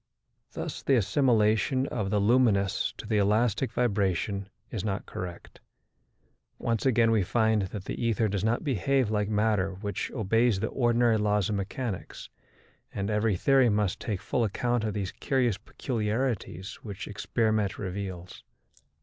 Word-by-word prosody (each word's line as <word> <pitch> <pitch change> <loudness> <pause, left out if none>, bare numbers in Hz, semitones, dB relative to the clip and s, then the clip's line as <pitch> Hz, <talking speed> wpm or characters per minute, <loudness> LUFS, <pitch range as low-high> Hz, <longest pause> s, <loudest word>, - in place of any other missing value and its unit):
Thus - - -5
the 135 - +3
assimilation 115 +2 +2
of 105 -5 -2
the 105 0 +1
luminous 105 -3 +2
to - - -8
the 105 -1 +1
elastic 110 +4 +2
vibration 100 -4 0 0.2
is 105 -6 -3
not 100 -1 -2
correct. 90 -1 -8 1.0
Once 115 +2 0
again 115 -3 +4
we 110 -2 +3
find 110 +2 +2
that 100 0 -7
the - - -4
ether 115 -1 +2
does 100 -1 -2
not 115 +2 +1
behave 135 - +1
like 105 -1 0
matter 105 -3 +1
which 100 0 -4
obeys 115 -1 +1
the 110 - -1
ordinary 120 -2 +2
laws 105 -1 +1
of 105 - 0
mechanics, 100 +1 -5 0.6
and 100 +1 -3
every 105 -1 +1
theory 135 +5 +4
must 105 -3 0
take 100 -4 -3
full 120 - 0
account 120 +2 0
of 110 -1 -2
these 95 -2 -2
curious 125 -7 0
peculiarities 110 - -3
which 100 -4 -7
experiment 110 -1 0
reveals. 95 -2 -6
105 Hz, 145 wpm, -28 LUFS, 100-120 Hz, 1.0 s, again